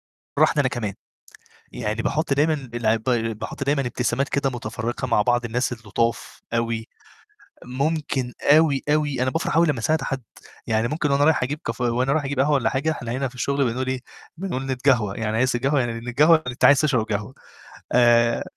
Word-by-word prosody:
تفرحني 150 - +1
أنا 135 - +2
كمان، 110 -5 -4 0.8
يعني 110 -2 -3
باحُط 150 +3 -1
دايمًا 155 +3 +2 0.2
بالعب 115 -1 +1
ب 125 - -1 0.3
باحُط 115 - -5
دايمًا 140 +1 +1
ابتسامات 125 +3 -1
كده 140 -1 0
متفرّقة 120 0 -4
مع 115 -4 +2
بعض 120 +1 +1
الناس 120 +2 -1
اللطاف 115 0 -3
أوي، 115 -1 -1 0.8
ممكن 135 -1 -2
أوي، 145 -1 +4
أوي 150 -4 +1
أنا 130 - +1
بافرح 165 +3 -2
أوي 170 +1 +5
لمّا 145 -6 0
أساعد 155 +6 +1
حد، 135 -1 -3 0.4
يعني 110 0 +1
ممكن 150 +2 -1
وأنا 140 +1 +3
رايح 155 -3 +3
أجيب 145 +4 -3
كاف 115 +2 -4
وأنا 125 +2 +1
رايح 155 -1 0
أجيب 140 -1 -3
قهوة 140 +3 +3
والّا 135 -4 +2
حاجة، 140 +4 0
إحنا 120 -6 -5
هنا 130 +3 -1
في 125 - -13
الشُغل 140 +3 0
بنقول 130 +1 -3
إيه، 130 0 -1 0.4
بنقول 165 -8 -4
نتقهوه، 125 -6 +1
يعني 110 -1 -2
عايز 130 +2 +2
تتقهوه 135 +4 +1
يعني 120 -2 -1
نتقهوه 145 +8 +4
يعني 155 - -7
أنت 120 - +1
عايز 140 -2 +6
تشرب 130 -7 +1
قهوة 105 +2 -4 0.6
آآ، 120 -1 +4
130 Hz, 185 wpm, -23 LUFS, 115-145 Hz, 0.8 s, عايز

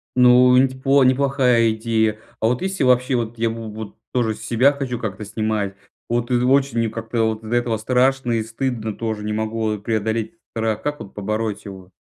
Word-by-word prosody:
Ну, 125 0 +6
не 135 +1 +5
ть 130 0 -11
по 135 0 +4
неплохая 130 -3 +3
идея. 110 -1 0 0.2
А 110 - +2
вот 125 +1 0
если 190 -4 -1
вообще 125 0 +3
вот 115 -1 -2
я 115 0 +1
в - - -3 0.2
вот 110 -1 -8 0.2
тоже 120 -3 +1
себя 125 +5 +2
хочу 130 -4 -4
как-то 105 -2 -5
снимать, 105 -2 -2 0.3
вот, 120 +1 -1
э, - - +3
очень 135 -1 +2
мне 115 - +1
как-то 115 +1 -2
от 110 0 -7
из-за 115 +2 -2
этого 120 -2 0
страшно 125 +2 +1
и 115 -1 0
стыдно 115 -2 -3
тоже, 110 -2 -3
не 105 - -2
могу 110 0 -1
преодолеть 110 +4 -2 0.2
страх, 110 -1 -1
как 145 0 -3
вот 100 - -10
побороть 110 +1 -3
его? 95 -2 -10
115 Hz, 195 wpm, -21 LUFS, 110-125 Hz, 0.3 s, Ну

